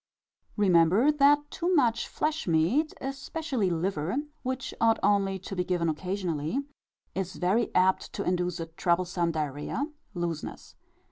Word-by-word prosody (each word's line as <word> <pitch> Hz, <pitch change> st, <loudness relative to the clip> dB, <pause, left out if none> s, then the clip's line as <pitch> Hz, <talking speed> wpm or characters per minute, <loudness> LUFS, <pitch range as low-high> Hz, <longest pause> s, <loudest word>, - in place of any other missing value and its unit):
Remember 190 Hz, -, +5 dB
that 290 Hz, 0 st, +4 dB
too 355 Hz, +2 st, 0 dB
much 235 Hz, -6 st, +2 dB
flesh 310 Hz, -3 st, -2 dB
meat, 175 Hz, -, +2 dB
especially 270 Hz, -, -2 dB
liver, 170 Hz, +1 st, -1 dB, 0.3 s
which 260 Hz, 0 st, -3 dB
ought 225 Hz, 0 st, +5 dB
only 195 Hz, -1 st, +2 dB
to 190 Hz, +1 st, -7 dB
be 180 Hz, -, 0 dB
given 175 Hz, -2 st, 0 dB
occasionally, 175 Hz, -, -2 dB, 0.6 s
is 190 Hz, 0 st, -3 dB
very 200 Hz, +6 st, +1 dB
apt 185 Hz, +1 st, +3 dB
to -, -, -3 dB
induce 180 Hz, -1 st, -1 dB
a 165 Hz, -, -3 dB
troublesome 170 Hz, +1 st, 0 dB
diarrhœa 155 Hz, -, -3 dB, 0.2 s
(looseness). 170 Hz, -3 st, -4 dB
190 Hz, 130 wpm, -28 LUFS, 170-255 Hz, 0.6 s, Remember